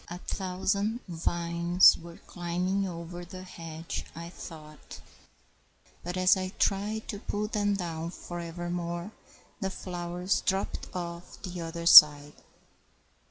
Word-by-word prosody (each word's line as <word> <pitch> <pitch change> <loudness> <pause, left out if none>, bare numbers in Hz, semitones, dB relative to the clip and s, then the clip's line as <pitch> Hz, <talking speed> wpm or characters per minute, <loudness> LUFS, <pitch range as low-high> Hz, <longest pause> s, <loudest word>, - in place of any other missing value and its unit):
A 175 - -6
thousand 200 +4 -2
vines 170 +1 +3
were 170 0 -11
climbing 180 +3 -2
o'er 175 0 -7
The 185 +1 -9
hedge, 165 -3 -7
I 170 +1 -7
thought, 155 -4 -11 1.0
but 180 +1 -5
as 185 +1 +5
I 185 0 -4
tried 210 +2 0
To 205 - -4
pull 210 0 -3
them 205 -2 0
down, 165 -3 -4
for 175 0 -8
evermore 175 +2 -4 0.5
The 195 - -2
flowers 180 0 -3
dropt 195 +1 -2
off 170 -1 -6
the 180 -2 -6
other 170 0 -6
side! 150 -3 +9
175 Hz, 120 wpm, -29 LUFS, 170-190 Hz, 1.0 s, side